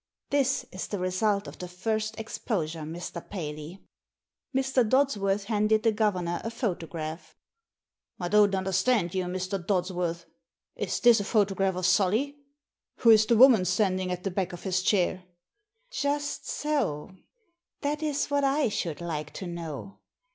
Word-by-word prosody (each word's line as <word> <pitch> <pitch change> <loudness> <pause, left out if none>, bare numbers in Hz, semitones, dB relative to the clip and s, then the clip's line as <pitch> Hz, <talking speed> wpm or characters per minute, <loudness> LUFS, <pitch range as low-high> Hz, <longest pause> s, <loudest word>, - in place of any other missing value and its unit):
This 275 -1 +1
is 185 - -5
the 205 - -3
result 200 +3 0
of - - -10
the 180 - -5
first 215 +4 -2
exposure, 180 -7 -3
Mr. 170 +2 -6
Paley." 155 -1 -6 0.7
Mr. 265 -1 +2
Dodsworth 215 -5 +2
handed 215 0 +1
the 225 - +4
governor 185 -6 0
a 225 - -2
photograph. 165 - -4 0.4
" - - -53
I 175 - -2
don't 205 +1 +4
understand 190 0 +1
you, 185 -1 -1
Mr. 185 +1 -3
Dodsworth. 175 -2 -1 0.5
Is - - -2
this 240 -2 +6
a - - -1
photograph 195 -3 +1
of 185 -1 -2
Solly? 210 +10 +2 0.7
Who 230 - +7
is 215 -1 +6
the 235 - +4
woman 245 -5 +7
stand 185 +1 +1
ing 185 -1 -2
at 180 0 -4
the 195 - -2
back 185 -1 -2
of 175 - -9
his 185 -2 0
chair? 185 -1 +1 0.4
" 435 +4 -47
"Just 290 0 -2
so— 250 - -1 0.7
that 295 +2 -1
is 295 -2 0
what 285 0 +2
I 275 -1 +2
should 170 -6 -3
like 155 -3 -4
to 190 - -6
know. 170 0 -7
195 Hz, 155 wpm, -28 LUFS, 180-230 Hz, 0.7 s, Who